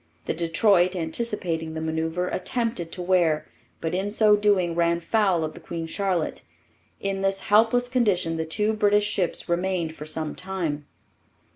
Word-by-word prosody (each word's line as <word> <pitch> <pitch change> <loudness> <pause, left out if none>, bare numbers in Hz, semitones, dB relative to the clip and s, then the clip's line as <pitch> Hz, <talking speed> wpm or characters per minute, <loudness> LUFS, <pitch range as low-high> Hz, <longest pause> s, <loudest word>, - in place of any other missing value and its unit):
The - - 0
Detroit, 175 +2 +3
anticipating 165 -3 -2
the - - -3
manoeuvre, 160 +2 -2
attempted 225 -4 -2
to 180 - -4
wear, 175 -4 +2 0.3
but 160 0 -2
in 190 +3 -1
so 210 0 +4
doing 200 -4 +2
ran 170 0 +2
foul 185 -1 +1
of 155 - -3
the - - -11
Queen 165 -1 -5
Charlotte. 180 -1 -1 0.6
In 195 -1 -2
this 195 0 0
helpless 225 +4 +3
condition 210 -10 +1
the 160 - -2
two 210 +7 0
British 205 -1 +3
ships 190 -4 -1
remained 175 -2 -1
for 150 - -8
some 155 -1 -2
time. 170 -6 -4
180 Hz, 155 wpm, -25 LUFS, 165-205 Hz, 0.6 s, so